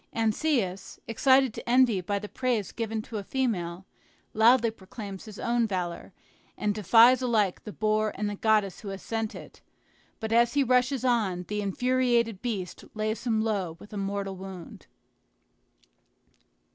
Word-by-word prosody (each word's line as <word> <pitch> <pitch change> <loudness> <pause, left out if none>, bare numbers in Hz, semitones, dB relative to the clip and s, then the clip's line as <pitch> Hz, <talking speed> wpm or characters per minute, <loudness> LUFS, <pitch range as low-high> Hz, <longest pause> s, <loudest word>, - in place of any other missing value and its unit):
Anceus, 220 -4 -1
excited 260 +1 +3
to - - -7
envy 245 -6 +4
by 200 +3 -2
the 210 +1 -5
praise 240 -5 -1
given 225 -1 -3
to 225 - -6
a - - -6
female, 190 -8 -2 0.5
loudly 230 +1 +5
proclaims 200 -1 -9
his 215 -2 -10
own 235 -1 +1
valor, 180 -4 -4 0.5
and 210 -1 0
defies 230 +5 +6
alike 220 -7 +1
the 210 - -6
boar 215 0 0
and 210 +1 -2
the 205 - -2
goddess 210 -2 +1
who 210 - -10
had 195 -1 -5
sent 225 0 -3
it; - - -12 0.6
but 220 -1 -4
as 235 +2 +3
he 285 - +4
rushes 255 +1 +2
on, 200 -8 +1
the 210 0 -2
infuriated 235 0 +1
beast 205 -7 -4
lays 215 +2 -2
him 220 -2 +2
low 195 -7 -2
with 210 - -13
a - - -4
mortal 195 0 -3
wound. 190 -2 -10
215 Hz, 155 wpm, -27 LUFS, 195-240 Hz, 0.6 s, defies